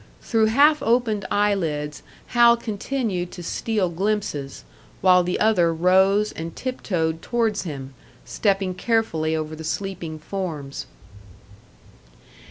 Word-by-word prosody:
Through 220 -1 +2
half 290 +7 +4
opened 225 -4 +1
eye 205 0 +2
lids 150 -6 -3 0.3
Hal 235 -1 +6
continued 215 -4 -3
to 175 - -8
steal 210 +2 -1
glimpses, 175 -6 -2 0.4
while 180 -1 +5
the 180 +1 -2
other 195 -6 +3
rose 190 +5 +3
and 165 +1 -7
tip 255 -1 -4
toed 160 -4 -1
towards 225 -4 -1
him, 135 -4 -6 0.3
stepping 195 -3 0
carefully 180 -6 0
over 155 0 -3
the 160 - -9
sleeping 170 -2 -4
forms. 155 -5 -5
190 Hz, 120 wpm, -23 LUFS, 160-220 Hz, 0.4 s, Hal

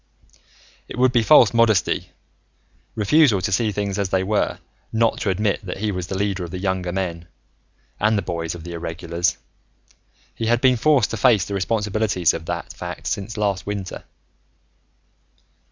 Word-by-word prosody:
It - - -8
would 130 0 +4
be 120 -2 +3
false 120 -2 +6
modesty, 115 -5 +2 0.9
refusal 115 +1 +4
to 100 +2 -2
see 105 +3 +1
things 100 0 -2
as 100 -2 -1
they 95 0 +1
were, 105 +2 0 0.3
not 115 0 +1
to 105 - -1
admit 100 +3 0
that 90 - -5
he 105 +1 -1
was 90 -2 -4
the 95 - -3
leader 100 -2 -1
of 85 - -6
the 90 - -5
younger 95 -1 -2
men, 85 -2 -3 0.7
and 105 +1 +2
the 100 - -1
boys 85 -2 -3
of 85 - -10
the 85 - -8
Irregulars. 85 +1 -2 1.0
He 115 - -3
had 120 +1 +3
been 130 0 +4
forced 140 -3 +3
to 115 - -3
face 110 -5 +4
the 100 - -6
responsibilities 105 -2 +1
of 80 - -6
that - - -4
fact - - -7
since 105 +3 -3
last 100 -2 -1
winter. 100 -3 -5
100 Hz, 170 wpm, -22 LUFS, 90-110 Hz, 1.0 s, false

